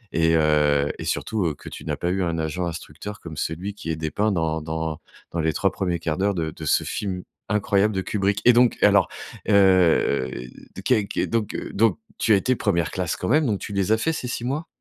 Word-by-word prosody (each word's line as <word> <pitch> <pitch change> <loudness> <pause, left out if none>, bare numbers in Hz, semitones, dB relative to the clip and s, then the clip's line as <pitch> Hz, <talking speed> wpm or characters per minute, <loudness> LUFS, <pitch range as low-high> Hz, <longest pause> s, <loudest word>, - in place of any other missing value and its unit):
et 80 0 +3
heu, 75 -2 +3
surtout 95 -8 -1
que - - -10
tu - - -9
n'as - - -1
pas 90 - -1
eu 95 0 0
un 85 -1 -1
agent 80 +3 -2
instructeur 85 +5 -7
comme 80 -2 -9
celui 90 +7 -3
qui 85 - -7
est 80 - 0
dépeint 90 +7 -1
dans 80 -3 0
dans 80 0 -4 0.3
dans 85 - -3
les 80 0 +1
3 95 - +1
premiers 90 -3 -1
1/4 80 -1 -2
d'heure 100 0 +1
de 80 -2 -2
de - - -9
ce - - +3
film 95 -3 -3 0.3
incroyable 105 0 +2
de 95 - 0
Kubrick! 100 +1 0
Et 125 - +8
donc 120 0 +4
alors, 100 -4 +5 0.4
heu, 90 -9 +4 0.5
de - - -7
qu'est 105 -2 +2 0.2
donc 115 -3 -1 0.2
donc 115 +2 +3 0.2
tu 110 - +3
as - - +7
été 125 +6 +1
1re 85 -9 0
classe 90 -3 -2
quand 90 - -4
même, 150 +4 +3
donc 100 -4 0
tu 100 - -6
les 100 +1 0
as 110 - +5
fait 160 +8 0
ces 125 - -4
6 120 - -4
mois? 145 +6 -2
95 Hz, 220 wpm, -24 LUFS, 80-105 Hz, 0.5 s, Et